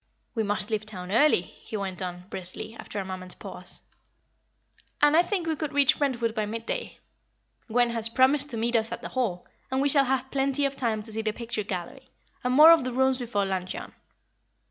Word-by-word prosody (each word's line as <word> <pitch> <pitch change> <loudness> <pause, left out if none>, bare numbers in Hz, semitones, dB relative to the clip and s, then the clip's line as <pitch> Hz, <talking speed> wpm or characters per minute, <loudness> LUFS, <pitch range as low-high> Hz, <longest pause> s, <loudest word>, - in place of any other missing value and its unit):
"We 225 - 0
must 205 0 +1
leave 215 -1 0
town 185 -4 -8
early," 235 -4 +4
he 215 - -8
went 190 -2 -4
on, 180 -1 -5
briskly, 190 +4 -4
after 210 - -8
a 195 - -3
moment's 185 -1 -6
pause - - -7 1.2
"and 295 +1 +5
I 335 - +7
think 360 -1 -2
we 320 -1 0
could 305 -1 -4
reach 285 +1 +4
Brentwood 240 -6 0
by 215 -2 -1
midday. 230 +2 -4 0.7
Gwen 240 +1 +2
has 230 -1 0
promised 270 +4 +3
to 235 - -3
meet 235 +2 0
us 225 0 +1
at - - -6
the - - -5
Hall, 220 -9 -2 0.2
and 260 - 0
we 285 +1 +2
shall 275 -1 +5
have 265 0 -1
plenty 275 +1 +2
of 275 0 -1
time 225 -5 -1
to 220 0 -2
see 220 - -1
the 220 -1 0
picture 230 -1 -4
gallery, 205 +7 -6 0.3
and 250 - 0
more 310 +3 +10
of 330 -4 +6
the 255 - -2
rooms 265 +1 +2
before 225 -5 -1
luncheon. 185 -1 -4
235 Hz, 205 wpm, -27 LUFS, 210-270 Hz, 1.2 s, more